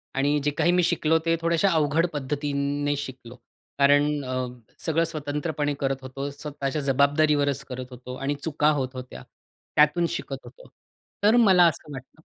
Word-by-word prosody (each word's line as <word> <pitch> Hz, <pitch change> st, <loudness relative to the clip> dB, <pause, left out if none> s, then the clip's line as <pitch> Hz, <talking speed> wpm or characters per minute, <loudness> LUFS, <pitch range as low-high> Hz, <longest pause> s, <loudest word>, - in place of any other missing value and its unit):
आणि 145 Hz, +2 st, +2 dB
जे 145 Hz, -, +1 dB
काही 175 Hz, -, +3 dB
मी 180 Hz, 0 st, +3 dB
शिकलो 160 Hz, -1 st, +2 dB
ते 165 Hz, 0 st, +3 dB
थोड्याश्या 170 Hz, +3 st, +2 dB
अवघड 160 Hz, +1 st, +2 dB
पद्धतीने 145 Hz, 0 st, -1 dB
शिकलो. 130 Hz, -3 st, -8 dB, 0.4 s
कारण 145 Hz, +1 st, +3 dB
अ, 130 Hz, 0 st, -2 dB, 0.4 s
सगळं 165 Hz, 0 st, +2 dB
स्वतंत्रपणे 150 Hz, -1 st, -2 dB
करत 135 Hz, -1 st, 0 dB
होतो. 135 Hz, +2 st, -5 dB
स्वतःच्या 145 Hz, 0 st, -4 dB
जबाबदारीवरच 140 Hz, +1 st, +2 dB
करत 130 Hz, 0 st, -5 dB
होतो. 125 Hz, 0 st, -8 dB
आणि 135 Hz, +2 st, -2 dB
चुका 150 Hz, -1 st, +2 dB
होत 130 Hz, -1 st, -2 dB
होत्या. 130 Hz, 0 st, -9 dB, 0.5 s
त्यातून 155 Hz, +3 st, +4 dB
शिकत -, -, -4 dB
होतो. -, -, -15 dB, 0.5 s
तर 215 Hz, +3 st, +5 dB
मला 190 Hz, -6 st, +6 dB
असं 155 Hz, -2 st, -4 dB
वाटतं 135 Hz, +4 st, -11 dB
145 Hz, 150 wpm, -25 LUFS, 135-160 Hz, 0.5 s, मला